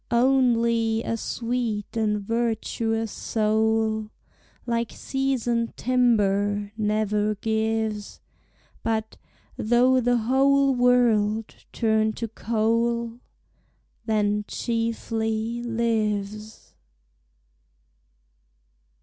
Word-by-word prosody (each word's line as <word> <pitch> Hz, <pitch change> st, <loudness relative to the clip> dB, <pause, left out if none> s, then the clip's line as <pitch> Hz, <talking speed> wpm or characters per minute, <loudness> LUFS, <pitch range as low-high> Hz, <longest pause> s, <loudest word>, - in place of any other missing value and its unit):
Onely 235 Hz, -3 st, +2 dB
a 230 Hz, -, -2 dB
sweet 230 Hz, -2 st, -3 dB
and 210 Hz, -2 st, 0 dB
vertuous 225 Hz, 0 st, -1 dB
soul, 220 Hz, 0 st, 0 dB, 0.6 s
Like 235 Hz, -1 st, -1 dB
seasoned 245 Hz, -4 st, -1 dB
timber, 205 Hz, -5 st, +1 dB
never 215 Hz, -1 st, 0 dB
gives; 220 Hz, -1 st, -2 dB, 0.6 s
But, 220 Hz, -1 st, -2 dB, 0.4 s
though 245 Hz, +3 st, +3 dB
the 245 Hz, 0 st, +2 dB
whole 270 Hz, +4 st, +3 dB
world, 230 Hz, -4 st, +2 dB, 0.2 s
turn 220 Hz, -1 st, +1 dB
to 230 Hz, -, -4 dB
coal, 230 Hz, +1 st, -1 dB, 0.9 s
Then 210 Hz, -1 st, +1 dB
chiefly 225 Hz, 0 st, -2 dB
lives. 215 Hz, -3 st, -2 dB
225 Hz, 70 wpm, -25 LUFS, 215-235 Hz, 0.9 s, though